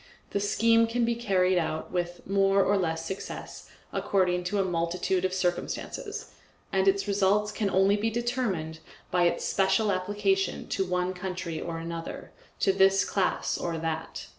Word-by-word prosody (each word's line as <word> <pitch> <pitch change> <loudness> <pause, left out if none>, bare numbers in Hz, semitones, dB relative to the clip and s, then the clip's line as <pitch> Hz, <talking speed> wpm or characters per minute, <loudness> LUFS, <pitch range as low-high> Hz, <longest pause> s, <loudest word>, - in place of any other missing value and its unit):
The 200 - 0
scheme 230 +3 +3
can 235 +1 +1
be 235 - +1
carried 190 -6 +2
out, 160 -1 -3
with 175 -1 -3
more 195 0 +3
or 205 - +2
less 165 -4 -1
success, 190 - -7 0.2
according 180 -2 +1
to 200 +3 -1
a - - +3
multitude 180 +1 0
of 185 - 0
circumstances, 180 -1 -3 0.4
and 190 0 +2
its 195 +1 +2
results 205 +1 +2
can 210 -1 -1
only 195 +1 +4
be 215 +2 0
determined 225 -10 -2 0.3
by 175 -1 +3
its 170 - +1
special 200 +2 +2
application 205 - 0
to - - 0
one 180 0 -1
country 180 -3 -4
or 165 -1 -4
another, 165 0 -6 0.3
to 195 - +4
this 195 0 +4
class 190 -2 0
or 170 -1 -2
that. 160 0 -4
190 Hz, 160 wpm, -28 LUFS, 175-205 Hz, 0.4 s, only